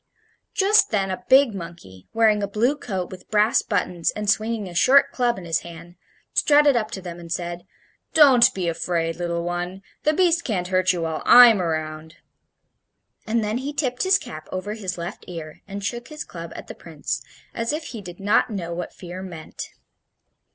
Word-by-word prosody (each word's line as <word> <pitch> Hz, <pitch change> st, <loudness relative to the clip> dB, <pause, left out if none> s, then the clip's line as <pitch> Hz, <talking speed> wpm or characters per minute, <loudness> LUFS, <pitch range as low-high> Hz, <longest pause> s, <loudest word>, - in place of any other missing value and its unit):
Just 405 Hz, +2 st, +4 dB
then 195 Hz, -3 st, 0 dB
a 185 Hz, -, -5 dB
big 265 Hz, -3 st, +6 dB
monkey, 170 Hz, -, -10 dB
wearing 220 Hz, -2 st, +3 dB
a 200 Hz, -, -1 dB
blue 230 Hz, +8 st, +1 dB
coat 190 Hz, -10 st, -5 dB
with 185 Hz, -1 st, -11 dB
brass 215 Hz, +1 st, +3 dB
buttons 180 Hz, -5 st, -1 dB
and 210 Hz, 0 st, -4 dB
swinging 220 Hz, 0 st, 0 dB
a 175 Hz, -, -9 dB
short 260 Hz, +11 st, +5 dB
club 245 Hz, -3 st, 0 dB
in 185 Hz, -, -8 dB
his 165 Hz, -1 st, 0 dB
hand, 170 Hz, 0 st, -12 dB, 0.4 s
strutted 290 Hz, -2 st, +4 dB
up 215 Hz, -2 st, 0 dB
to 190 Hz, -4 st, -7 dB
them 175 Hz, -1 st, -7 dB
and 170 Hz, -1 st, -11 dB
said: 175 Hz, +1 st, -4 dB, 0.5 s
"Don't 270 Hz, -6 st, +7 dB
be 185 Hz, -2 st, -2 dB
afraid, 165 Hz, 0 st, -1 dB
little 170 Hz, -1 st, -2 dB
one. 175 Hz, +2 st, -4 dB, 0.2 s
The 305 Hz, -, +2 dB
beast 340 Hz, 0 st, +2 dB
can't 180 Hz, -6 st, -2 dB
hurt 185 Hz, 0 st, +3 dB
you 175 Hz, -2 st, -2 dB
while 160 Hz, -1 st, -3 dB
I'm 240 Hz, -5 st, +8 dB
around!" 155 Hz, -1 st, -4 dB, 1.1 s
And 225 Hz, +1 st, +1 dB
then 215 Hz, +3 st, -1 dB
he 280 Hz, +3 st, -4 dB
tipped 260 Hz, -4 st, -2 dB
his 380 Hz, +1 st, +4 dB
cap 155 Hz, -, -10 dB
over 185 Hz, +3 st, -4 dB
his 190 Hz, -5 st, -5 dB
left 170 Hz, +3 st, -6 dB
ear 160 Hz, -3 st, -8 dB
and 200 Hz, 0 st, -6 dB
shook 240 Hz, +2 st, -4 dB
his 305 Hz, -1 st, -7 dB
club -, -, -9 dB
at -, -, -8 dB
the -, -, -8 dB
Prince, -, -, -5 dB, 0.3 s
as 230 Hz, 0 st, -2 dB
if 305 Hz, +2 st, -3 dB
he 230 Hz, -4 st, -7 dB
did 175 Hz, -2 st, -10 dB
not 205 Hz, +5 st, +2 dB
know 175 Hz, -6 st, -4 dB
what 175 Hz, 0 st, -5 dB
fear 180 Hz, 0 st, -8 dB
meant. 170 Hz, -4 st, -8 dB
195 Hz, 190 wpm, -23 LUFS, 175-235 Hz, 1.1 s, I'm